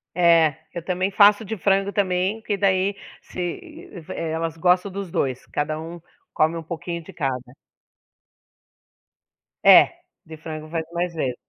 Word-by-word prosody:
É, 165 Hz, -4 st, +4 dB, 0.2 s
eu 170 Hz, -, -6 dB
também 185 Hz, +2 st, -1 dB
faço 205 Hz, +2 st, +5 dB
de 220 Hz, +1 st, -4 dB
frango 195 Hz, +1 st, +1 dB
também, 190 Hz, +1 st, 0 dB
porque 205 Hz, -2 st, -2 dB
daí 195 Hz, 0 st, +1 dB, 0.3 s
se 300 Hz, -, -7 dB, 0.2 s
eh, 160 Hz, -1 st, -4 dB
elas 165 Hz, 0 st, -3 dB
gostam 180 Hz, +3 st, +2 dB
dos 195 Hz, -2 st, -6 dB
2. 130 Hz, -5 st, -2 dB
Cada 155 Hz, +1 st, -2 dB
um 165 Hz, +1 st, -8 dB, 0.3 s
come 160 Hz, +2 st, +2 dB
um 165 Hz, -, -6 dB
pouquinho 170 Hz, +1 st, -6 dB
de -, -, -13 dB
cada. 130 Hz, -4 st, -3 dB, 2.1 s
É. -, -, +8 dB, 0.4 s
De 160 Hz, 0 st, -10 dB
frango 155 Hz, -1 st, -8 dB
faz 165 Hz, 0 st, -2 dB
mais 175 Hz, 0 st, -2 dB
vezes. 135 Hz, -6 st, -2 dB
170 Hz, 145 wpm, -23 LUFS, 160-195 Hz, 2.1 s, É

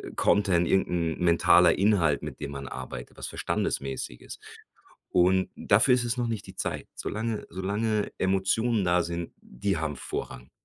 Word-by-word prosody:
Content, 90 Hz, -4 st, +3 dB
irgend 95 Hz, -, +2 dB
'n 85 Hz, -2 st, -1 dB
mentaler 85 Hz, -1 st, +5 dB
Inhalt, 90 Hz, -8 st, +2 dB
mit -, -, -7 dB
dem 70 Hz, -1 st, -4 dB
man 70 Hz, -1 st, -6 dB
arbeitet, 65 Hz, -1 st, -8 dB
was -, -, -5 dB
Verständnis-mäßiges. -, -, -1 dB, 1.3 s
Und 95 Hz, +1 st, +3 dB
dafür 125 Hz, +6 st, +4 dB
ist 120 Hz, -1 st, -1 dB
es 120 Hz, +1 st, -1 dB
noch 120 Hz, -1 st, 0 dB
nicht 110 Hz, -4 st, -4 dB
die -, -, -11 dB
Zeit. -, -, -3 dB
Solange 110 Hz, 0 st, -3 dB
solange 105 Hz, +3 st, -1 dB
Emotionen 95 Hz, +3 st, +1 dB
da 90 Hz, 0 st, +3 dB
sind. 85 Hz, 0 st, -5 dB
Die 90 Hz, +9 st, -2 dB
haben 75 Hz, -2 st, -3 dB
Vorrang. 60 Hz, 0 st, -6 dB
95 Hz, 150 wpm, -27 LUFS, 85-105 Hz, 1.3 s, mentaler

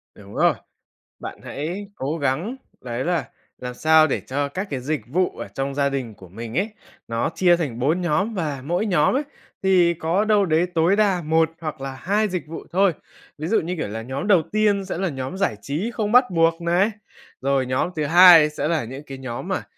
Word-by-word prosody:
Đúng 100 Hz, 0 st, -14 dB
rồi. -, -, +4 dB, 0.7 s
Bạn -, -, -8 dB
hãy 175 Hz, +8 st, -5 dB
cố 145 Hz, +5 st, -3 dB
gắng 155 Hz, -, -1 dB, 0.3 s
đấy 125 Hz, 0 st, -4 dB
là 175 Hz, -1 st, -1 dB, 0.3 s
làm 125 Hz, 0 st, -6 dB
sao 155 Hz, +4 st, +5 dB
để 135 Hz, -, -1 dB
cho 140 Hz, +2 st, -2 dB
các 190 Hz, +7 st, -5 dB
cái 135 Hz, -3 st, -3 dB
dịch 150 Hz, +4 st, -2 dB
vụ 180 Hz, +8 st, 0 dB
ở -, -, -6 dB
trong 135 Hz, 0 st, -4 dB
gia 140 Hz, 0 st, +2 dB
đình 130 Hz, -5 st, -4 dB
của 95 Hz, -3 st, -15 dB
mình 115 Hz, -, -7 dB
ấy, 200 Hz, +4 st, +1 dB, 0.4 s
nó 115 Hz, +5 st, -1 dB
chia 175 Hz, -2 st, +4 dB
thành 135 Hz, -8 st, -3 dB
4 155 Hz, +8 st, +1 dB
nhóm, 175 Hz, +6 st, 0 dB
và 150 Hz, -8 st, -3 dB
mỗi 175 Hz, +7 st, 0 dB
nhóm 175 Hz, -1 st, +2 dB
ấy 280 Hz, -, +1 dB, 0.4 s
thì 180 Hz, -3 st, +4 dB
có 170 Hz, +6 st, 0 dB
đâu 210 Hz, -2 st, +3 dB
đấy 165 Hz, 0 st, +2 dB
tối 165 Hz, +4 st, +3 dB
đa 200 Hz, -4 st, +2 dB
1 160 Hz, 0 st, +2 dB
hoặc 155 Hz, -4 st, -5 dB
là 135 Hz, 0 st, -4 dB
2 210 Hz, +4 st, +1 dB
dịch 180 Hz, -6 st, -4 dB
vụ 160 Hz, -, -7 dB
thôi. 190 Hz, 0 st, +3 dB, 0.4 s
Ví 155 Hz, +2 st, -4 dB
dụ 220 Hz, -, +3 dB
như, 175 Hz, +3 st, -3 dB
kiểu, 155 Hz, -, -2 dB
là 110 Hz, +2 st, -5 dB
nhóm 130 Hz, -, -5 dB
đầu 190 Hz, -6 st, +5 dB
tiên 205 Hz, -2 st, +2 dB
sẽ 190 Hz, -, -4 dB
là 190 Hz, 0 st, -1 dB
nhóm 135 Hz, +4 st, -5 dB
giải 195 Hz, -, 0 dB
trí 170 Hz, +12 st, -3 dB
không 215 Hz, -3 st, -2 dB
bắt 250 Hz, +2 st, +6 dB
buộc 165 Hz, 0 st, +2 dB
này, 175 Hz, +6 st, +2 dB, 0.5 s
rồi 135 Hz, -1 st, +1 dB
nhóm 130 Hz, +6 st, 0 dB
thứ 155 Hz, -2 st, -1 dB
hai 170 Hz, -1 st, +8 dB
sẽ 150 Hz, -, -3 dB
là 160 Hz, -4 st, 0 dB
những 135 Hz, +5 st, -8 dB
cái 135 Hz, -2 st, -9 dB
nhóm 130 Hz, -3 st, -6 dB
mà -, -, -2 dB
160 Hz, 220 wpm, -22 LUFS, 135-185 Hz, 0.7 s, hai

